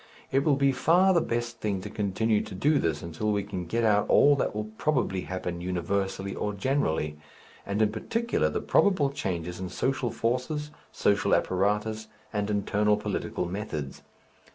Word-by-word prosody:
It 135 +1 +3
will 145 -2 +3
be 140 0 +3
far 175 +8 +4
the 170 - +4
best 120 -2 -3
thing 100 -3 -1
to - - -6
continue 105 +1 +1
to - - -8
do 145 +9 +3
this 80 -2 -1
until 85 +6 -2
we 100 -1 0
can 95 -3 -5
get 115 +6 0
out 105 -2 +3
all 145 0 +6
that 130 - -1
will 105 - -1 0.2
probably 125 -11 +1
happen 90 -2 -4
universally 95 +2 -2
or 105 - -2
generally, 80 - -1 0.5
and 100 +2 +1
in 105 - +2
particular 230 - 0
the - - -2
probable 160 -9 +3
changes 90 - -4
in 95 -1 -4
social 130 +6 -1
forces, 130 +7 -2 0.2
social 100 -1 +2
apparatus 105 +3 0 0.3
and 105 0 -1
internal 105 0 +2
political 105 - -3
methods. 85 -7 -5
105 Hz, 165 wpm, -27 LUFS, 95-130 Hz, 0.5 s, all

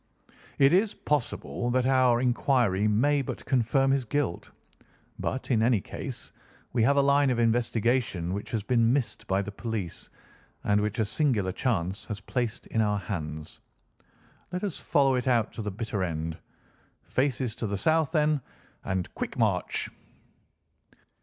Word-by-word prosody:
It 140 +2 +5
is 200 +3 +3
possible 125 -3 -2
that 125 +1 +2
our 130 -2 +4
inquiry 120 -5 +2
may 140 +7 +3
but 135 - -6
confirm 135 +1 +2
his 135 -1 +2
guilt; 130 -6 -2 0.7
but, 130 +1 -3
in 115 -3 +3
any 115 -1 +4
case, - - -7 0.4
we 120 - +2
have 140 +6 +4
a 140 - +5
line 140 0 +4
of 125 - +1
investigation 115 -5 +1
which 100 - -4
has 110 -3 -2
been 115 +1 +3
missed 135 -4 -2
by 95 +1 +1
the 105 - -6
police, 105 -4 -5 0.5
and 105 0 +2
which 105 +2 -2
a 110 - +2
singular 105 -5 +1
chance 95 -3 -1
has 105 -3 -5
placed 115 +1 -3
in 110 - 0
our 105 -1 +2
hands. 80 -6 -5 0.9
Let 180 +2 -3
us 195 -6 -3
follow 135 -2 +3
it 125 0 -1
out 120 -4 +2
to - - -5
the 105 - -3
bitter 105 -1 -3
end. 80 -2 -3 0.7
Faces 130 -3 0
to 115 -1 -3
the 100 0 -2
south, 160 +7 +2
then, 150 -3 +2 0.4
and 95 -2 -1
quick - - -4
march!" - - 0
120 Hz, 155 wpm, -28 LUFS, 105-135 Hz, 0.9 s, It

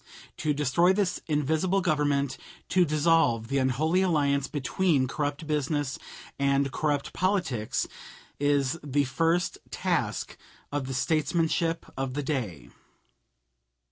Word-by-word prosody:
To 155 - 0
destroy 150 +5 +3
this 190 -2 0
invisible 160 +5 +1
Government, 145 -5 +1 0.3
to 185 -1 +4
dissolve 150 -7 +2
the 140 0 +1
unholy 150 +8 +2
alliance 145 -6 +2
between 145 0 +1
corrupt 145 +3 -3
business 145 -2 -1 0.4
and 140 0 +2
corrupt 145 -1 -1
politics, 175 - 0 0.5
is 145 +1 +1
the 145 0 +1
first 165 +6 0
task - - -2 0.3
of 145 -2 -2
the 135 - -3
statesmanship 165 +3 +1
of 135 -1 -3
the 145 - -1
day. 120 - -3
145 Hz, 110 wpm, -27 LUFS, 135-165 Hz, 0.5 s, to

